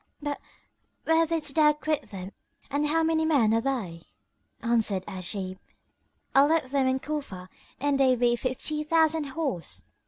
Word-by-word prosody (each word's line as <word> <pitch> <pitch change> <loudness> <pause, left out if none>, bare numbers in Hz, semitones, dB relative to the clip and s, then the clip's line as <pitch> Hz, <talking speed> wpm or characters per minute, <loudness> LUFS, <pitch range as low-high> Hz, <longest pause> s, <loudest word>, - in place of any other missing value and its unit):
But 290 -1 -4 0.6
where 325 0 +3
didst 310 -3 0
thou 300 -1 +5
quit 305 0 -2
them 190 -1 -7 0.4
and 290 +2 +1
how 325 +2 +2
many 320 0 +2
men 275 -9 +3
are 230 - +2
they?" 220 -11 -3 0.6
Answered 220 -5 +1
Ajib, 185 0 -4 0.7
"I 275 - +7
left 295 -3 +1
them 275 -2 +2
in 260 0 +1
Cufa 265 -12 -5 0.3
and 285 0 +1
they 260 -2 +5
be 240 0 +2
fifty 260 +5 -2
thousand 320 0 +2
horse." 275 - -4
275 Hz, 150 wpm, -27 LUFS, 230-305 Hz, 0.7 s, I